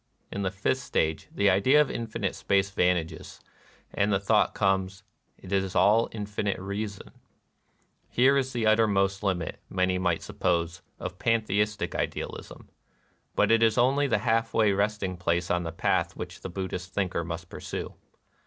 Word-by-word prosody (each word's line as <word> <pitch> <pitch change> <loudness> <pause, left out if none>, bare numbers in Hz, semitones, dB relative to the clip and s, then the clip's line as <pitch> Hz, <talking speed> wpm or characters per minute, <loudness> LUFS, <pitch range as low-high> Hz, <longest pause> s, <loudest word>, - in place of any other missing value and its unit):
In 100 - -3
the 95 - 0
fifth 100 +7 -1
stage 80 - -1
the 100 - +1
idea 115 +10 +4
of 150 - +3
infinite 115 -2 -3
space 100 0 +1
vanishes, 90 -4 -1 0.5
and 100 +1 +1
the 100 - +2
thought 100 - +2
comes: 95 -1 0 0.3
It 95 - -12
is 95 -1 0
all 110 +3 +4
infinite 105 -2 -3
reason, 100 +1 -5 1.0
[Here 130 +3 +4
is 135 -1 0
the 120 -3 -1
uttermost 100 -3 +3
limit, 90 -5 -2
many 90 0 +1
might 85 -2 0
sup - - -11
pose, 85 0 0 0.2
of 90 - -6
pantheistic 105 -2 0
idealism; - - -5 0.7
but - - +3
it 115 0 +4
is 115 0 +3
only 135 +4 +3
the 115 - +2
half 115 0 +1
way 110 -2 +4
resting 100 -2 -1
place 85 0 0
on 90 0 +1
the 80 -1 -4
path 80 - 0
which - - -7
the - - -6
Buddhist 90 0 -5
thinker 90 -4 0
must 85 +1 -6
pursue. - - -6
100 Hz, 160 wpm, -27 LUFS, 90-110 Hz, 1.0 s, idea